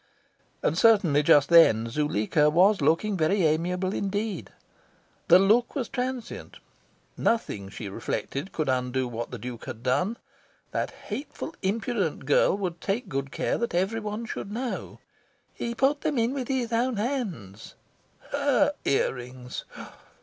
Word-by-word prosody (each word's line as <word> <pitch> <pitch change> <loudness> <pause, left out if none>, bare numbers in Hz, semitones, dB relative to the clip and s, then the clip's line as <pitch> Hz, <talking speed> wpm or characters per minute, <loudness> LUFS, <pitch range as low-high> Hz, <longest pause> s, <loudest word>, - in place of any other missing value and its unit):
And 155 - +1
certainly, 185 -8 +5
just 145 -1 +5
then, 115 -10 +6
Zuleika 150 +2 +1
was 185 +4 +4
looking 165 +8 +2
very 180 +3 +2
amiable 180 +5 0
indeed. 200 -1 -2 0.8
The 175 - +8
look 215 +6 +3
was 260 -6 -1
transient. 250 -2 -4 0.6
Nothing, 105 - -1
she 105 +1 -7
reflected, 140 - -4
could 155 -3 -2
undo 130 0 0
what 120 0 -5
the - - -6
Duke 120 -2 -7
had 115 - -8
done. 145 - +1 0.5
That - - -1
hateful, 300 +3 -7
impudent 200 - -1
girl 145 +6 +3
would 180 -4 -4
take 205 +1 -2
good 135 -1 -3
care - - -1
that 235 -6 -2
every 195 +6 +1
one 210 +1 -4
should 205 - -6
know. 245 +3 -4 0.6
"He 235 0 -4
put 280 +4 +2
them 290 - -1
in 235 +2 +1
with 260 -3 -3
his 250 -3 -1
own 240 0 +1
hands." 200 - -4 0.6
HER - - +2
ear - - +2
rings! 125 0 -8
185 Hz, 140 wpm, -26 LUFS, 140-230 Hz, 0.8 s, The